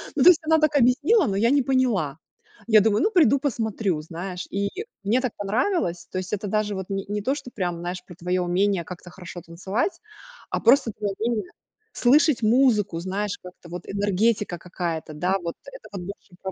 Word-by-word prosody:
Ну, -, -, +3 dB
то 360 Hz, -, +10 dB
есть 345 Hz, -2 st, +6 dB
она 320 Hz, 0 st, +4 dB
так 305 Hz, -1 st, +2 dB
объяснила, 290 Hz, -, +4 dB
но 195 Hz, -1 st, -1 dB
я 230 Hz, +3 st, +3 dB
не 285 Hz, -, +4 dB
поняла. 240 Hz, -, +1 dB, 0.5 s
Я 215 Hz, -2 st, +7 dB
думаю, 210 Hz, 0 st, +2 dB
ну, 430 Hz, -, +2 dB
приду, 290 Hz, -, +5 dB
посмотрю, 220 Hz, -, -1 dB
знаешь, 180 Hz, +3 st, -6 dB
и 200 Hz, +1 st, -1 dB, 0.3 s
мне 230 Hz, +6 st, +2 dB
так 255 Hz, -4 st, -1 dB
понравилось. 205 Hz, -, -1 dB
То -, -, -4 dB
есть, 185 Hz, +1 st, -4 dB
это 210 Hz, 0 st, -2 dB
даже 210 Hz, 0 st, 0 dB
вот 190 Hz, -1 st, -6 dB
не 195 Hz, -1 st, -3 dB
не 205 Hz, +1 st, -2 dB
то, 260 Hz, +7 st, 0 dB
что 270 Hz, -, -8 dB
прям, 175 Hz, -4 st, -3 dB
знаешь, 180 Hz, +1 st, -5 dB
про 175 Hz, -, -12 dB
твоё 180 Hz, +1 st, -1 dB
умение 185 Hz, +1 st, +1 dB
как-то 180 Hz, +1 st, -10 dB
хорошо 175 Hz, -1 st, -9 dB
танцевать, 190 Hz, -, -3 dB, 0.5 s
а -, -, -1 dB
просто 245 Hz, 0 st, +4 dB
твоё 205 Hz, -1 st, -3 dB
умение 220 Hz, -4 st, -2 dB, 0.4 s
слышать 270 Hz, 0 st, +4 dB
музыку, 215 Hz, -6 st, +3 dB
знаешь, 195 Hz, +3 st, -3 dB
как-то 180 Hz, -1 st, -12 dB
вот 175 Hz, +1 st, -6 dB
энергетика 205 Hz, -1 st, 0 dB
какая-то, 170 Hz, -3 st, -4 dB
да. 180 Hz, +6 st, 0 dB
Вот 170 Hz, -1 st, -4 dB
это -, -, -12 dB
вот 190 Hz, -, -5 dB
больше 190 Hz, 0 st, -10 dB
про 190 Hz, -, -4 dB
200 Hz, 195 wpm, -24 LUFS, 180-245 Hz, 0.5 s, то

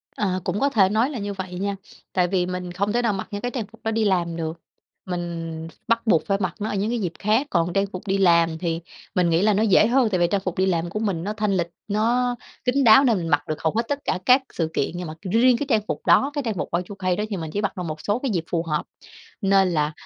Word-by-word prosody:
Ờ, 185 Hz, -3 st, 0 dB
cũng 205 Hz, -, -1 dB
có 280 Hz, -, +2 dB
thể 200 Hz, -8 st, +4 dB
nói 225 Hz, +6 st, +2 dB
là 265 Hz, -, -5 dB
như 205 Hz, 0 st, -3 dB
vậy 185 Hz, -2 st, -6 dB
nha. 200 Hz, 0 st, -1 dB, 0.4 s
Tại 180 Hz, -1 st, +2 dB
vì 180 Hz, -1 st, +1 dB
mình 180 Hz, -1 st, -4 dB
không 200 Hz, +4 st, -1 dB
thể 240 Hz, -, +2 dB
nào 230 Hz, -3 st, +1 dB
mặc 190 Hz, -, -4 dB
những 205 Hz, -, -4 dB
cái 245 Hz, +2 st, -2 dB
trang 230 Hz, -5 st, -3 dB
phục 225 Hz, -, -18 dB
đó 225 Hz, -, 0 dB
đi 225 Hz, 0 st, +1 dB
làm 175 Hz, -4 st, +1 dB
được, 165 Hz, 0 st, -4 dB, 0.5 s
mình 165 Hz, -2 st, -4 dB, 0.2 s
bắt 230 Hz, 0 st, +1 dB
buộc 165 Hz, -, +3 dB
phải 195 Hz, -1 st, +1 dB
mặc 185 Hz, -2 st, -1 dB
nó 215 Hz, -, -2 dB
ở -, -, -2 dB
những 200 Hz, +2 st, 0 dB
cái 240 Hz, 0 st, -1 dB
dịp 180 Hz, -5 st, -2 dB
khác. 220 Hz, +7 st, +2 dB
Còn 170 Hz, -4 st, +1 dB
trang 195 Hz, 0 st, +2 dB
phục 185 Hz, 0 st, -9 dB
đi 195 Hz, +1 st, +1 dB
làm 170 Hz, -3 st, +4 dB
thì 165 Hz, -1 st, -2 dB, 0.4 s
mình 180 Hz, -2 st, +3 dB
nghĩ 165 Hz, +1 st, +3 dB
là 210 Hz, +1 st, +4 dB
nó 210 Hz, -, +2 dB
dễ 215 Hz, 0 st, +5 dB
hơn, 245 Hz, -2 st, +3 dB
tại 185 Hz, -, 0 dB
vì 175 Hz, -, +4 dB
trang 200 Hz, -, +1 dB
phục 185 Hz, -2 st, -4 dB
đi 190 Hz, -, +3 dB
làm 175 Hz, -2 st, 0 dB
của 215 Hz, -, -3 dB
mình 195 Hz, -6 st, -1 dB
nó 210 Hz, -, -2 dB
thanh 210 Hz, -3 st, 0 dB
lịch, 170 Hz, -1 st, 0 dB, 0.2 s
nó 240 Hz, +4 st, +1 dB, 0.3 s
kín 270 Hz, +3 st, +2 dB
đáo 235 Hz, +3 st, +8 dB
nên 235 Hz, -7 st, +3 dB
mình 170 Hz, -, -3 dB
mặc 145 Hz, -1 st, +3 dB
được 155 Hz, -1 st, -4 dB
hầu 160 Hz, -, +1 dB
hết 230 Hz, -, +2 dB
tất 285 Hz, -1 st, -1 dB
cả 185 Hz, -, 0 dB
các 255 Hz, +2 st, +6 dB
sự 165 Hz, -2 st, -1 dB
kiện. 135 Hz, -, 0 dB
Nhưng 175 Hz, -1 st, -5 dB
mà 155 Hz, -, -6 dB, 0.2 s
riêng 240 Hz, +2 st, +5 dB
cái 290 Hz, -, -2 dB
trang 220 Hz, -5 st, +3 dB
phục -, -, -4 dB
đó, 280 Hz, +2 st, +4 dB
cái 290 Hz, -, -1 dB
trang 225 Hz, -, 0 dB
phục 180 Hz, -, -4 dB
Y2K 185 Hz, 0 st, -2 dB
đó 210 Hz, -, -1 dB
thì 200 Hz, -, -3 dB
mình 160 Hz, -2 st, -5 dB
chỉ 205 Hz, -, -2 dB
mặc 200 Hz, -, -2 dB
được 180 Hz, -, -3 dB
một 155 Hz, -2 st, -5 dB
số 205 Hz, +3 st, 0 dB
cái 270 Hz, -1 st, -2 dB
dịp 170 Hz, -4 st, -1 dB
phù 165 Hz, -1 st, 0 dB
hợp, 150 Hz, -3 st, -1 dB, 0.6 s
nên 195 Hz, -1 st, +4 dB
là, 150 Hz, -3 st, 0 dB
195 Hz, 290 wpm, -23 LUFS, 175-220 Hz, 0.6 s, đáo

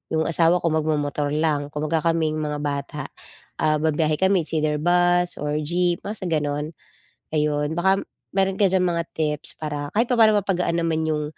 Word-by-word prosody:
Yung 160 Hz, -, +2 dB
asawa 170 Hz, +2 st, +3 dB
ko -, -, +2 dB
mag 155 Hz, -1 st, 0 dB
momotor 145 Hz, -1 st, -1 dB
lang 150 Hz, -2 st, 0 dB
kumbaga 155 Hz, +2 st, 0 dB
kaming 155 Hz, -1 st, 0 dB
mga 150 Hz, -1 st, -3 dB
bata, 140 Hz, 0 st, -3 dB, 0.6 s
ah, 155 Hz, 0 st, +3 dB
babiyahe 155 Hz, 0 st, +1 dB
kami 190 Hz, -2 st, +3 dB
it's -, -, -9 dB
either 150 Hz, -1 st, +1 dB
bus 175 Hz, +1 st, +3 dB
or 150 Hz, +1 st, -1 dB
jeep, 175 Hz, +2 st, +1 dB
basta 205 Hz, -1 st, -5 dB
gano'n. 150 Hz, 0 st, -1 dB, 0.6 s
Ayun, 150 Hz, 0 st, 0 dB
baka 190 Hz, +2 st, +3 dB, 0.3 s
meron 195 Hz, -1 st, +1 dB
ka 200 Hz, -, +5 dB
diyang 185 Hz, -1 st, +2 dB
mga 170 Hz, -, 0 dB
tips 150 Hz, -1 st, -2 dB
para 145 Hz, -1 st, -3 dB
kahit 230 Hz, +2 st, +3 dB
papa'no 225 Hz, -3 st, +5 dB
mapagaan 180 Hz, -3 st, 0 dB
naman 160 Hz, -1 st, 0 dB
yung, 150 Hz, -1 st, 0 dB
160 Hz, 175 wpm, -23 LUFS, 150-175 Hz, 0.6 s, ka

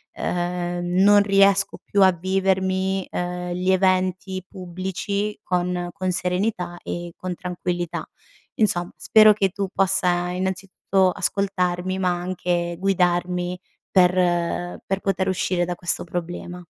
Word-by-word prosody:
uhm, 175 Hz, 0 st, -2 dB, 0.2 s
non 205 Hz, 0 st, +7 dB
riesco 195 Hz, 0 st, +3 dB
più 200 Hz, -, +1 dB
a 190 Hz, -, +7 dB
vivermi, 190 Hz, +1 st, 0 dB
ehm, 180 Hz, 0 st, -3 dB
gli 180 Hz, +1 st, -1 dB
eventi 185 Hz, 0 st, +1 dB
pubblici 190 Hz, +3 st, -4 dB
con 180 Hz, -1 st, -1 dB
con 185 Hz, -2 st, -2 dB
serenità 180 Hz, 0 st, -2 dB
e 175 Hz, 0 st, -5 dB
con 185 Hz, -1 st, -5 dB
tranquillità. 175 Hz, -1 st, -4 dB, 0.5 s
Insomma, 175 Hz, -5 st, +1 dB
spero 215 Hz, -1 st, +6 dB
che 200 Hz, -2 st, +1 dB
tu 195 Hz, +1 st, -3 dB
possa 180 Hz, -2 st, +1 dB
innanzitutto 190 Hz, 0 st, 0 dB
ascoltarmi, 185 Hz, -1 st, -1 dB
ma 185 Hz, -1 st, +1 dB
anche, 175 Hz, -1 st, -2 dB
guidarmi 180 Hz, -1 st, 0 dB, 0.3 s
per 175 Hz, -1 st, +2 dB
per 195 Hz, 0 st, -1 dB
poter 190 Hz, -1 st, 0 dB
uscire 185 Hz, -1 st, 0 dB
da 180 Hz, -, -3 dB
questo 175 Hz, 0 st, -2 dB
problema. 175 Hz, +1 st, -5 dB
185 Hz, 120 wpm, -23 LUFS, 175-190 Hz, 0.5 s, non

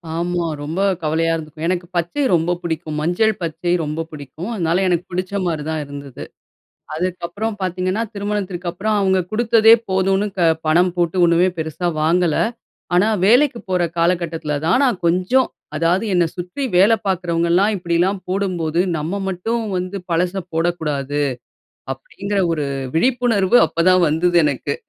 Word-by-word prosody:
ஆமா, 175 Hz, +1 st, -1 dB, 0.2 s
ரொம்ப 160 Hz, +6 st, -3 dB, 0.2 s
கவலையா 160 Hz, +1 st, +1 dB
இருந்திருக்கும். 160 Hz, 0 st, -5 dB
எனக்கு 175 Hz, 0 st, -1 dB
பச்சை 175 Hz, -, -1 dB
ரொம்ப 170 Hz, 0 st, +2 dB
புடிக்கும். 160 Hz, -2 st, -4 dB
மஞ்சள், 180 Hz, +7 st, +2 dB
பச்சை 170 Hz, +1 st, -2 dB
ரொம்ப 155 Hz, +2 st, -3 dB
புடிக்கும். 150 Hz, -, -8 dB
அதுனால 175 Hz, -2 st, 0 dB
எனக்கு 175 Hz, -1 st, 0 dB
பிடிச்ச 185 Hz, +2 st, -3 dB
மாதிரி 160 Hz, -4 st, -2 dB
தான் 160 Hz, -1 st, -2 dB
இருந்தது. 140 Hz, -2 st, -9 dB, 0.7 s
அதுக்கப்புறம் 180 Hz, +5 st, -3 dB
பாத்தீங்கன்னா? 185 Hz, +3 st, -1 dB
திருமணத்திற்கு 200 Hz, -3 st, -3 dB
அப்புறம் 210 Hz, +5 st, -1 dB
அவங்க 190 Hz, -1 st, +2 dB
குடுத்ததே 225 Hz, 0 st, +5 dB, 0.2 s
போதும்னு 190 Hz, +2 st, +1 dB
க -, -, +2 dB, 0.3 s
பணம் 175 Hz, +3 st, +3 dB
போட்டு 175 Hz, +1 st, 0 dB
ஒண்ணுமே 170 Hz, +2 st, +4 dB
பெருசாக 160 Hz, +2 st, -2 dB
வாங்கல. 170 Hz, 0 st, +2 dB, 0.6 s
ஆனா, 185 Hz, +4 st, +4 dB, 0.2 s
வேலைக்கு 245 Hz, +3 st, +4 dB
போற 180 Hz, -1 st, +1 dB
காலகட்டத்துல 165 Hz, -3 st, 0 dB
தான் 185 Hz, +11 st, +3 dB
நான் 240 Hz, -8 st, 0 dB
கொஞ்சம், 185 Hz, +10 st, +2 dB, 0.3 s
அதாவது 170 Hz, +6 st, +1 dB
என்ன 175 Hz, -1 st, +4 dB
சுத்தி 180 Hz, +10 st, -5 dB
வேல 200 Hz, +5 st, +6 dB
பார்க்குறவங்கலாம் 175 Hz, +2 st, +1 dB
இப்படிலாம் 175 Hz, +2 st, 0 dB
போடும்போது 180 Hz, -4 st, 0 dB, 0.2 s
நம்ப 165 Hz, +7 st, -3 dB
மட்டும் 225 Hz, +6 st, -2 dB
வந்து 185 Hz, +2 st, -4 dB
பழச 175 Hz, +2 st, +1 dB, 0.2 s
போடக்கூடாது. 150 Hz, -4 st, -1 dB, 0.7 s
அப்படிங்குற 200 Hz, +9 st, -4 dB
ஒரு 150 Hz, -2 st, -2 dB, 0.3 s
விழிப்புணர்வு 240 Hz, -1 st, +2 dB
அப்போதான் 180 Hz, +1 st, +3 dB
வந்தது 175 Hz, +3 st, +1 dB
எனக்கு. 140 Hz, 0 st, -1 dB
175 Hz, 135 wpm, -20 LUFS, 165-195 Hz, 0.7 s, வேல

